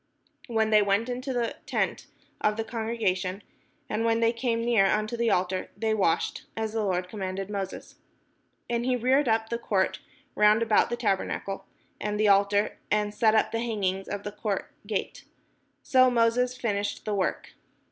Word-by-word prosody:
When 220 -2 +1
they 215 -1 +6
went 205 +4 +1
into 255 +2 -3
the 240 -2 -1
tent - - -1 0.3
of 210 0 +1
the 225 - -1
congregation, 210 -5 -2 0.4
and 215 +2 -1
when 230 0 +2
they 230 0 +3
came 230 -1 -1
near 225 -5 +4
unto 215 +3 0
the 235 0 +1
altar, 185 -1 0
they 220 -1 0
washed; 190 -6 0
as 220 -1 -2
the 225 - 0
Lord 180 -2 -1
commanded 195 0 -4
Moses. 195 -2 -5 0.7
And 235 0 -1
he 255 0 +1
reared 260 +4 +2
up 220 0 +1
the 235 - -2
court 190 -5 0 0.3
round 210 +2 +4
about 220 -2 +3
the 240 - -2
tabernacle 195 -3 -2 0.3
and 210 0 -2
the 215 - +4
altar, 200 +1 +3
and 210 0 +1
set 220 -1 +3
up 220 - +2
the 230 - -1
hanging 195 -5 -1
of 205 0 -4
the 205 - -4
court 205 -2 -3 0.2
gate. 205 -2 -3 0.6
So 255 -1 +5
Moses 245 +1 +2
finished 205 -4 -2
the 215 - -1
work. 195 -2 -1
215 Hz, 170 wpm, -27 LUFS, 200-230 Hz, 0.7 s, they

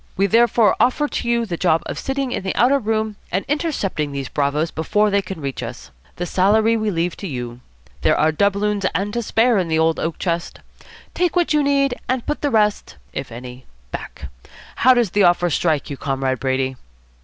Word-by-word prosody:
We 195 - +3
therefore 230 0 +4
offer 295 +4 +2
you 235 -1 0
the 175 -5 -4
job 165 -3 +2
of - - -5
sitting 270 -1 -2
in - - -2
the 190 0 -3
outer 270 +3 +4
room 220 -2 -1
and 190 +3 -1
intercepting 270 - -1
these 140 -1 -4
bravoes 150 +3 0
before 210 +7 +1
they 200 0 +3
can 190 -3 -7
reach 140 -3 -4
us. - - -8 0.2
The 175 - -3
salary 215 +5 +3
we 215 -1 0
leave 175 -2 -1
to 200 - -6
you. 120 -5 -5 0.4
There - - +3
are 155 +1 +3
doubloons 200 +4 +1
and 200 +4 -1
to 235 - -1
spare 225 0 +2
in 180 - -1
the 160 -1 +1
old 160 0 +2
oak 165 0 -2
chest. 170 -1 -3 0.5
Take 355 -1 0
what 350 -3 +2
you 300 - +3
need 280 -2 +2 0.2
and 255 -2 0
put 300 - -3
the 290 - +1
rest 210 -4 +1 0.2
if 135 -2 -5
any 125 +2 -10 0.2
back. 70 - -7 0.5
How 255 +1 +5
does 235 -7 +1
the 205 - +2
offer 175 -1 +3
strike 150 -2 0
you, 140 - -5
Comrade 135 -2 -1
Brady?" 130 0 -1
195 Hz, 200 wpm, -20 LUFS, 155-235 Hz, 0.5 s, How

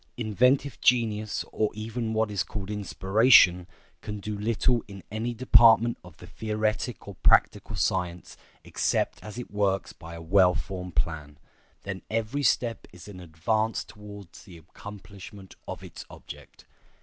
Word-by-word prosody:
Inventive 125 +5 +1
genius, 110 -3 +1
or 110 - 0
even 110 +1 -4
what 110 -1 0
is 100 -4 -1
called 100 +2 -5
inspiration, 95 -2 +4 0.3
can 105 -1 -6
do 105 +1 -5
little 115 +3 0
in 100 -2 -11
any 115 +3 -3
department 115 -1 +5
of - - -15
the - - -12
theoretic 110 +2 -3
or 100 - -7
practical - - +3
science 90 -1 -2 0.3
except - - -1
as 105 +1 -9
it 125 - -7
works 100 -2 -1
by 85 0 -11
a 85 - -9
well 90 +1 +4
formed 90 -3 -6
plan; 75 +2 -3 0.5
then 95 -1 -6
every 115 +5 -2
step 120 -4 0
is 90 0 -13
an 100 -3 -10
advance 95 +7 -1
towards 105 -3 -12
the 90 -5 -13
accomplishment 100 +3 -12
of - - -7
its - - -10
object. - - -13
105 Hz, 145 wpm, -27 LUFS, 95-110 Hz, 0.5 s, department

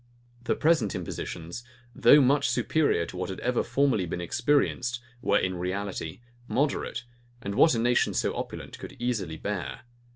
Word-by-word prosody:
The - - +1
present 155 -10 +2
impositions, 85 +8 -5 0.3
though 145 +6 +7
much 140 +2 +3
superior 145 - +2
to 85 - -9
what 90 0 -3
had 95 - -5
ever 125 0 +1
formerly 130 -10 +1
been 85 - -3
experienced, 120 - +1 0.2
were - - +3
in 95 -1 0
reality 95 0 -4 0.3
moderate, 140 -2 -1 0.4
and 100 -4 -4
what 160 +6 +5
a - - 0
nation 120 +1 +2
so - - 0
opulent - - -6
could - - -9
easily 110 -10 -2
bear. 100 0 -4
115 Hz, 155 wpm, -27 LUFS, 90-135 Hz, 0.4 s, though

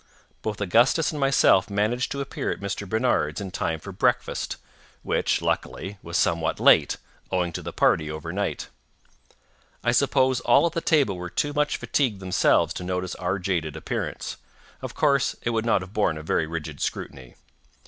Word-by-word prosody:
Both 105 -1 -4
Augustus 120 - +3
and 150 - -5
myself 135 -9 +4
managed 105 +5 0
to 140 - -2
appear 140 - -4
at - - -3
Mr. 100 0 -4
Barnard's 110 -10 +1
in 100 -2 -5
time 80 -3 -2
for - - -9
breakfast—which, - - -2
luckily, 100 +1 -2
was 85 +1 -3
somewhat 85 -3 +1
late, - - +5 0.3
owing 90 -2 0
to - - -4
the - - -6
party 80 -1 +2
over 80 +2 -5
night. 100 +1 -2 1.2
I 120 - +3
suppose 130 0 +3
all - - +4
at 170 - +1
the 165 - -1
table 140 - +2
were 90 0 -5
too 145 +10 -1
much 150 0 +1
fatigued 125 -9 0
themselves 95 -1 +2
to - - -6
notice 90 0 -2
our 95 +1 -2
jaded 85 -5 -2
appearance—of 80 - -6
course, 140 -3 +2
it 120 - 0
would 115 0 -1
not 110 - +3
have 90 +2 -10
borne 105 -8 +1
a 75 - -7
very 80 0 0
rigid 80 -2 -6
scrutiny. 65 -3 -5
100 Hz, 170 wpm, -25 LUFS, 85-125 Hz, 1.2 s, late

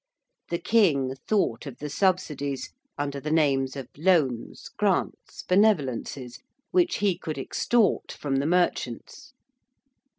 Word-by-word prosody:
The 170 - 0
King 165 - +2
thought 155 - 0
of 130 - -8
the 150 - -5
subsidies 150 -6 -1 0.2
under 140 -1 -3
the 150 - -5
names 140 -4 +2
of 135 -3 -6
loans, 150 -8 +1
grants, - - -1
benevolences 140 - +1 0.3
which 355 -1 +3
he 200 -3 +1
could 155 -2 -5
extort 220 - +1
from 135 -2 -2
the 140 +2 0
merchants. 180 - -1
150 Hz, 120 wpm, -26 LUFS, 135-185 Hz, 0.3 s, which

